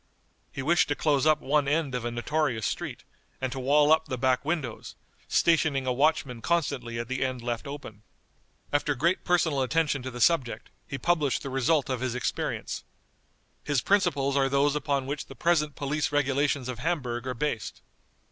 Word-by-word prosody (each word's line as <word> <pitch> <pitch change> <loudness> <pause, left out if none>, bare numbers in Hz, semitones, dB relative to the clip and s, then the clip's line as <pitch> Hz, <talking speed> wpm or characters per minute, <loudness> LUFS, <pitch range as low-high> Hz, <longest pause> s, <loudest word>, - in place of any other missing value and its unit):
He 135 - -5
wished 170 +5 +3
to 145 - 0
close 145 -1 +2
up 155 0 +4
one 145 0 +1
end 145 -2 0
of 125 -2 -2
a - - 0
notorious 120 -1 -1
street, - - -4 0.4
and 130 -1 -2
to 130 - -4
wall 145 +3 +4
up 160 0 +4
the 130 - -3
back 130 +1 +1
windows, 145 -7 -3 0.3
stationing 155 -5 +2
a 130 - +1
watchman 135 -3 +1
constantly 140 -8 -1
at 115 0 -3
the 130 +1 -1
end 130 -2 -3
left 120 +3 -3
open. 140 -7 -8 0.7
After 145 0 +1
great 170 +8 +1
personal 165 -6 +2
attention 150 0 +1
to 130 - -5
the 125 -1 -8
subject, 120 -4 +1 0.2
he 135 - -4
published 150 -1 +1
the 135 - -5
result 135 +2 +2
of 130 -3 -2
his 130 -2 -2
experience. 125 -2 -3 0.8
His 145 -4 0
principles 140 -9 +2
are 135 -1 +3
those 140 +1 +2
upon 140 -2 0
which 140 +1 -4
the - - -11
present 150 -4 +1
police 145 +2 -1
regulations 140 -1 +1
of 125 -2 -5
Hamburg 125 -6 -2
are 130 - -2
based. 120 -3 -3
140 Hz, 180 wpm, -27 LUFS, 125-150 Hz, 0.8 s, up